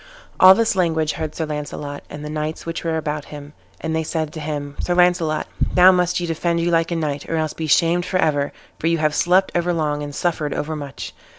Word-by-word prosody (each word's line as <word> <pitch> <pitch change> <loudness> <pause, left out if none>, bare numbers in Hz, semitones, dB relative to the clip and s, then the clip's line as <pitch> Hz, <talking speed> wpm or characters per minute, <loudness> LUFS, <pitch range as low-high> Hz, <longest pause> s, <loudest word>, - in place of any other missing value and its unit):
All 185 +1 +9
this 225 -1 +1
language 160 -4 +1
heard 155 -1 -5
Sir 160 - -2
Launcelot, 150 -1 -5
and 150 0 -8
the - - -5
knights 155 +1 -4
which 165 0 -4
were 165 -1 0
about 150 -2 -3
him; 145 0 -10 0.3
and 160 0 -2
they 160 - +1
said 155 -1 -3
to 160 - -6
him, 145 -2 -4
"Sir 175 - 0
Launcelot, 175 -3 +2 0.3
now 185 +1 +8
must 180 -1 +1
ye 175 - -2
defend 170 +1 -1
you 170 +1 0
like 165 -1 +2
a 170 - -1
knight, 150 -3 -3
or 165 - -1
else 155 -1 -1
be 160 - -4
shamed 170 +3 +3
for 185 - 0
ever, 145 -4 +1 0.3
for 165 - -1
you 165 0 +2
have 155 -1 +1
slept 185 +5 +3
overlong 165 -4 0
and 145 -1 -6
suffered 155 -4 -1
overmuch." 145 -2 -5
160 Hz, 220 wpm, -21 LUFS, 150-170 Hz, 0.3 s, All